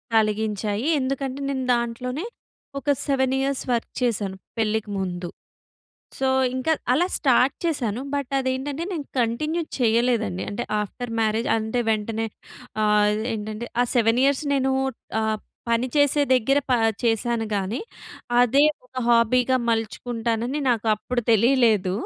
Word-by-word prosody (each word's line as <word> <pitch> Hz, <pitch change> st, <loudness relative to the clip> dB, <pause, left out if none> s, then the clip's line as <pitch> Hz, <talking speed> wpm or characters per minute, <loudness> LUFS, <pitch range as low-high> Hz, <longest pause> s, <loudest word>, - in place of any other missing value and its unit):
కలిగించాయి. 215 Hz, 0 st, 0 dB
ఎందుకంటే 270 Hz, 0 st, -2 dB
నేను 265 Hz, -2 st, -2 dB
దాంట్లోనే 250 Hz, -, -3 dB, 0.5 s
ఒక 290 Hz, -, -4 dB, 0.2 s
7 265 Hz, -2 st, +1 dB
ఇయర్స్ 275 Hz, 0 st, -1 dB
వర్క్ 230 Hz, -, -2 dB
చేశాను 205 Hz, -5 st, -1 dB, 0.2 s
పెళ్ళికి 220 Hz, -1 st, 0 dB
ముందు. 180 Hz, -2 st, -3 dB, 0.9 s
సో 265 Hz, 0 st, +1 dB, 0.3 s
ఇంకా 260 Hz, +5 st, +1 dB, 0.2 s
అలా 345 Hz, +7 st, +3 dB
స్టార్ట్ 260 Hz, -1 st, +3 dB
చేశాను. 250 Hz, -9 st, -1 dB
బట్ 280 Hz, -3 st, -2 dB
అది 260 Hz, -1 st, -1 dB
ఏంటంటే 280 Hz, +4 st, -4 dB
నేను 305 Hz, -5 st, -3 dB
కంటిన్యూ 305 Hz, +9 st, 0 dB, 0.2 s
చేయలేదండి. 230 Hz, -, +1 dB
అంటే 100 Hz, -, -3 dB, 0.2 s
ఆఫ్టర్ 230 Hz, +3 st, -5 dB
మ్యారేజ్ 220 Hz, +1 st, +1 dB
అంటే 220 Hz, +2 st, -1 dB
వెంటనే 220 Hz, +1 st, -1 dB, 0.6 s
ఆహ్, 210 Hz, 0 st, +4 dB, 0.2 s
ఏంటంటే 215 Hz, +2 st, -5 dB, 0.2 s
ఆ -, -, +2 dB
7 230 Hz, 0 st, +3 dB
ఇయర్స్ 280 Hz, +2 st, +2 dB
నేను 265 Hz, -1 st, +1 dB, 0.5 s
ఆహ్, 220 Hz, 0 st, 0 dB, 0.3 s
పని 230 Hz, +2 st, +2 dB
చేసే 285 Hz, 0 st, +4 dB
దగ్గర 265 Hz, +3 st, +3 dB
ప -, -, +5 dB, 0.3 s
చేశాను 230 Hz, 0 st, +1 dB
గాని, 200 Hz, +5 st, -2 dB, 0.6 s
అదే 255 Hz, +4 st, +4 dB, 0.2 s
ఒక 250 Hz, -, -42 dB
హాబీగా 240 Hz, +2 st, +4 dB
మలుచుకుంటానని 230 Hz, +3 st, -1 dB
నాకు 230 Hz, -2 st, 0 dB
అప్పుడు 245 Hz, +3 st, -2 dB
తెలియలేదు. 225 Hz, -4 st, +3 dB
235 Hz, 130 wpm, -24 LUFS, 220-265 Hz, 0.9 s, ప